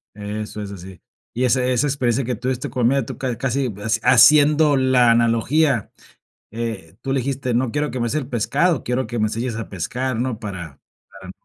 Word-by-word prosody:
Eso 105 +1 -6
es 100 -1 -6
así. 95 -2 -11 0.3
Y 125 +1 +1
esa 125 +1 +2
esa 125 +3 +1
experiencia 130 -2 0
que 125 0 -2
tuviste 125 +2 -3
con 125 -3 +1
miedo, 135 -2 +1
tú - - -8
ca 125 -3 -2
casi, 135 +1 -1
eh, 120 - -2 0.3
haciendo 145 +3 +6
la 130 -2 +4
analogía, 120 +3 +2 0.6
eh, 110 -8 -5
tú 135 - -4
le 135 - +1
dijiste: 130 -1 -2
"No 120 -1 0
quiero 150 0 -1
que 130 - -4
me 120 - 0
des 135 - -3
el 145 -4 -2
pescado, 140 +6 0
quiero 125 +1 -1
que 120 - -4
me 110 0 +1
se 115 - -4
enseñes 120 -2 -3
a - - -6
pescar", 125 +8 -3
¿no? 120 -3 -2
Para 90 -9 -7 0.3
para 95 -1 -13
no 95 - -9
125 Hz, 210 wpm, -21 LUFS, 110-135 Hz, 0.6 s, haciendo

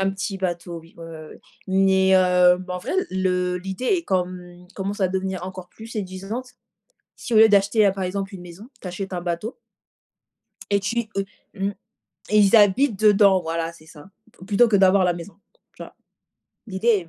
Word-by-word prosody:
Un 195 0 +1
petit 195 0 -4
bateau, 175 -2 -4
oui. 165 +1 -20
Ouais, 165 - -9
ouais, 165 - -10
ouais, 155 -1 -10
ouais. - - -14 0.3
Mais 190 0 +3
heu, 180 -1 +4
en 180 0 -3
vrai - - -5 0.2
le 180 -1 0
l'idée 190 +7 -5
est 360 -4 +2
comme 180 -1 -4
commence 200 +1 -4
à 190 - +3
devenir 190 -1 -3
encore 185 -1 -9
plus 225 - -12
séduisante. 210 +4 -6 0.7
Si 240 - -5
au - - +5
lieu 220 0 +8
d'acheter, 205 +1 +3
heu, - - +3
par 195 -1 -4
exemple, 195 +2 -4
une 180 - -10
maison, 180 +6 -12
tu 185 - -7
achètes 190 +1 -6
un 175 - -3
bateau 175 +6 -4 1.1
et 200 0 +2
tu 230 +3 -2
heu, 195 - 0 0.3
mmh, 195 0 -2 0.6
et 210 - +4
ils 205 +2 +5
habitent 205 +2 +4
dedans 200 -3 +5
voilà 165 0 -3
c'est 160 -1 -18
ça 160 +2 -14 0.4
plutôt 210 +4 +4
que 215 - +3
d'avoir 190 0 +4
la 180 - +2
maison. 175 +3 -9 0.4
Tu - - -9
vois? - - -12 0.7
L'idée 200 +3 -3
est 190 -7 +2
190 Hz, 195 wpm, -23 LUFS, 180-205 Hz, 1.1 s, lieu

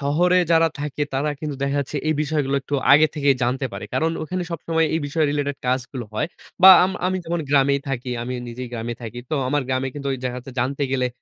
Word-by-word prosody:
শহরে 175 +6 +3
যারা 165 0 +5
থাকে 145 0 -3
তারা 145 +3 0
কিন্তু 150 -3 -4
দেখা 140 +1 0
যাচ্ছে 140 +2 -5
এই 155 - +2
বিষয়গুলো 145 -2 -1
একটু 145 - -4 0.2
আগে 155 +2 +7
থেকেই 140 -3 +2
জানতে 130 +2 0
পারে। 100 +1 -6
কারণ 160 +1 +1
ওখানে 180 +3 -3
সবসময় 165 -1 0
এই 160 - 0
বিষয় 155 +2 0
রিলেটেড 145 -1 -1
কাজগুলো 130 -1 -2
হয়। 150 +9 -1 0.3
বা 190 - +12
আম 185 - 0 0.2
আমি 185 - 0
যেমন 170 +1 -2
গ্রামেই 140 -1 +3
থাকি, 125 -2 -3
আমি 125 +1 -4
নিজেই 125 +1 -6
গ্রামে 120 0 -4
থাকি। 115 +1 -7
তো - - +1
আমার 145 0 +1
গ্রামে 130 +1 0
কিন্তু 140 -1 -6
ওই - - -2
দেখা 125 0 -2
যাচ্ছে 130 +1 -10
জানতে 140 +3 -1
গেলে 125 -1 +1
140 Hz, 220 wpm, -22 LUFS, 130-155 Hz, 0.3 s, বা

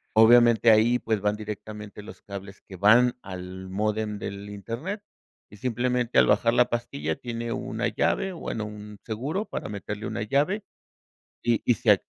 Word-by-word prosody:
Obviamente, 120 +1 +7
ahí, 115 +3 +5
pues, 110 -2 -1
van 105 +1 +1
directamente 105 -1 -7
los - - -11
cables 100 -1 -9
que 95 - -12
van 115 +6 +5
al 95 0 -7
módem 105 +1 -1
del 100 0 -6
Internet, 115 - -5 0.5
y 105 - -14
simplemente 125 +1 0
al - - +6
bajar 115 -1 +3
la 125 0 +4
pastilla, 80 -10 -2
tiene 115 -1 -5
una 115 +1 -2
llave, 120 - 0
bueno, 115 -10 -4
un 105 0 -9
seguro 140 - -2
para - - -5
meterle 105 +1 -5
una - - -3
llave, 150 - +1 0.8
y 120 -2 +1
y 120 - +5
se 120 -2 +3
ac 100 - +4
110 Hz, 165 wpm, -26 LUFS, 105-120 Hz, 0.8 s, Obviamente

